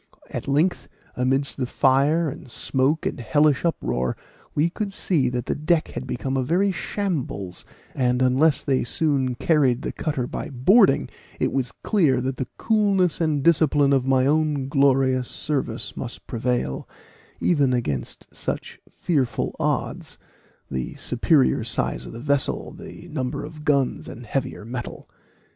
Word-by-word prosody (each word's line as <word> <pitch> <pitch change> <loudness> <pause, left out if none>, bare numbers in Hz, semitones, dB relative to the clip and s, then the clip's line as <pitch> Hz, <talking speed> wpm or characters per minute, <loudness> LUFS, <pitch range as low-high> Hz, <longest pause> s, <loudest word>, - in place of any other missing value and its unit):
At - - -5
length, 150 +6 +1 0.3
amidst 135 +2 0
the 130 -3 -1
fire 145 +6 +3
and 130 - -7
smoke 135 +6 0
and - - -2
hellish 145 +2 +2
uproar, 65 - -1 0.4
we 150 +3 +3
could 200 +4 -4
see 155 -9 +1
that 125 -1 -3
the - - 0
deck 155 +2 +1
had 130 - -6
become 130 +2 -3
a 135 - +1
very 180 +9 +2
shambles; 150 - -3 0.3
and 125 -1 +1
unless 130 +4 +3
they 135 -2 +1
soon 135 -1 0
carried 135 -2 +2
the - - -2
cutter 145 -6 -2
by 150 - -5
boarding, 135 - +4 0.3
it - - 0
was 130 -4 0
clear 155 - +3
that 130 +1 -2
the 130 - -3
coolness 200 -6 +2
and 150 -4 +1
discipline 145 -3 +4
of 135 -1 +2
my 130 -1 +3
own 150 -2 +1
glorious 135 -2 +3
service 150 -3 -2
must - - -6
prevail, 120 - -2 0.5
even 145 -7 +2
against 75 - -2
such - - -4
fearful 135 -9 -1
odds; - - -2 0.5
the 65 -1 -3
superior 130 0 +2
size 65 - -2
of - - -8
the 115 - -8
vessel, 140 +1 0
greater 175 - -10
number 135 -4 -3
of 155 0 -10
guns, 140 -3 +1
and 120 +2 -9
heavier 130 -2 -3
metal. 120 +1 -6
135 Hz, 150 wpm, -24 LUFS, 125-155 Hz, 0.5 s, boarding